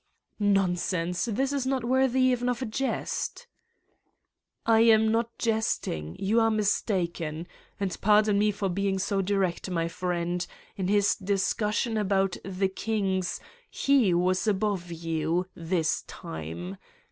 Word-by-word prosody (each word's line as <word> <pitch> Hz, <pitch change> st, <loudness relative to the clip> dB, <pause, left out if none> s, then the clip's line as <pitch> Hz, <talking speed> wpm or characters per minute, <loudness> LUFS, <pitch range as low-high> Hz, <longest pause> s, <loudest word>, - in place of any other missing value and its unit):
' -, -, -58 dB
' -, -, -46 dB, 0.2 s
Nonsense! 180 Hz, -1 st, -1 dB
This 260 Hz, +5 st, -1 dB
is 270 Hz, -2 st, -1 dB
not 265 Hz, -2 st, 0 dB
worthy 260 Hz, +1 st, +2 dB
even 250 Hz, -1 st, +2 dB
of 245 Hz, +1 st, -1 dB
a -, -, -1 dB
jest. 270 Hz, -, -3 dB, 0.6 s
" -, -, -51 dB
"I 225 Hz, -1 st, +5 dB
am 220 Hz, -1 st, +5 dB
not 230 Hz, +1 st, -1 dB
jesting. 220 Hz, -, -1 dB
You 210 Hz, +4 st, +2 dB
are 225 Hz, 0 st, +4 dB
mistaken. 175 Hz, -6 st, -1 dB, 0.3 s
And 195 Hz, -2 st, -1 dB
pardon 210 Hz, 0 st, +4 dB
me 210 Hz, +1 st, +3 dB
for 200 Hz, -1 st, -1 dB
being 195 Hz, +1 st, 0 dB
so 195 Hz, +1 st, 0 dB
direct, 190 Hz, -2 st, -1 dB
my 165 Hz, -2 st, 0 dB
friend: 175 Hz, 0 st, -2 dB, 0.3 s
in 190 Hz, -2 st, -2 dB
his 205 Hz, 0 st, +3 dB
discussion 210 Hz, +3 st, 0 dB
about 195 Hz, -2 st, +1 dB, 0.4 s
kings 195 Hz, -4 st, -1 dB, 0.3 s
he 270 Hz, -8 st, +3 dB
was 185 Hz, +3 st, +1 dB
above 195 Hz, -4 st, 0 dB
you, 165 Hz, +1 st, -1 dB
this 165 Hz, -1 st, 0 dB
time. 85 Hz, +4 st, -7 dB
195 Hz, 135 wpm, -27 LUFS, 175-220 Hz, 0.6 s, I